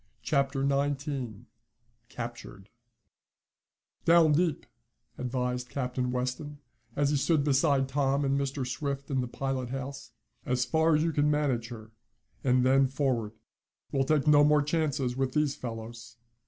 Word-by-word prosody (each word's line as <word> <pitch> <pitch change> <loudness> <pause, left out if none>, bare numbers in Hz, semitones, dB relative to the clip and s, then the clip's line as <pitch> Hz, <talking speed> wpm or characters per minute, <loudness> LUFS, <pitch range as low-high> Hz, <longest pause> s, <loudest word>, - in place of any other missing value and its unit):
Chapter 140 -1 0
Nineteen 140 -5 -2 0.6
Captured 115 -4 -8 1.3
"Down 165 -2 +5
deep," 160 +1 +1 0.5
advised 125 0 -2
Captain 125 -2 -2
Weston, 130 +4 -3 0.4
as 145 0 +1
he 145 - +2
stood 150 +1 +2
beside 140 -1 +2
Tom 140 +1 +1
and 135 0 +1
Mr. 140 -1 -2
Swift 140 +2 -4
in 135 -1 +1
the 125 - -3
pilot 130 0 -3
house. 135 +1 -6 0.3
"As 125 -1 0
far 160 +5 +3
as 150 - +2
you 165 - +1
can 145 0 +2
manage 140 -6 0
her, 110 -2 -10 0.5
and 125 -1 +3
then 135 +1 +4
forward. 130 -5 -1 0.6
We'll 135 -1 +1
take 150 0 +1
no 150 -1 +6
more 150 0 +4
chances 145 -5 -1
with 130 -1 -1
these 150 -2 +1
fellows." 115 0 -8
135 Hz, 140 wpm, -29 LUFS, 125-145 Hz, 1.3 s, no